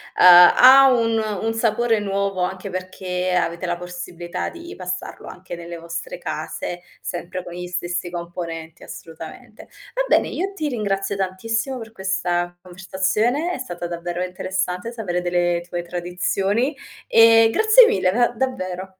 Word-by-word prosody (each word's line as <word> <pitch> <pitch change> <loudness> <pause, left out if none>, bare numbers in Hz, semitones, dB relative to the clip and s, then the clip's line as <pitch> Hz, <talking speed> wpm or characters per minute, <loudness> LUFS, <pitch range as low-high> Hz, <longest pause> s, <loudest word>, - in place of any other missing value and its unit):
ha 250 +10 +8
un 230 -2 +2 0.3
un 225 0 0
sapore 225 0 +1
nuovo, 195 -2 -2
anche 190 +2 -3
perché 185 0 -3
avete 170 0 -1
la 175 0 -1
possibilità 175 -1 -6
di 345 +1 -10
passarlo 185 0 -6
anche 180 -1 -9
nelle 170 0 -8
vostre 170 - -6
case, 175 - -5 0.2
sempre 180 +1 -5
con 175 - -9
gli 180 0 -6
stessi 175 0 -3
componenti, 170 -1 -7
assolutamente. 165 -1 -11 0.3
Va - - +1
bene, - - +3
io 385 +2 -3
ti 310 -6 -2
ringrazio 200 -6 -2
tantissimo 225 +7 -2
per 225 -2 -9
questa 175 -3 -2
conversazione. 195 - -1
È - - -3
stata 175 -9 -6
davvero 175 +1 -4
interessante 185 +2 -3
sapere 185 -7 -3
delle 175 -1 0
tue 175 0 -3
tradizioni, 185 - -1 0.3
e 225 0 +7
grazie 440 +3 +7
mille 185 - +2
da 240 +4 +3
davvero. 190 -7 -4
185 Hz, 140 wpm, -21 LUFS, 175-225 Hz, 0.3 s, ha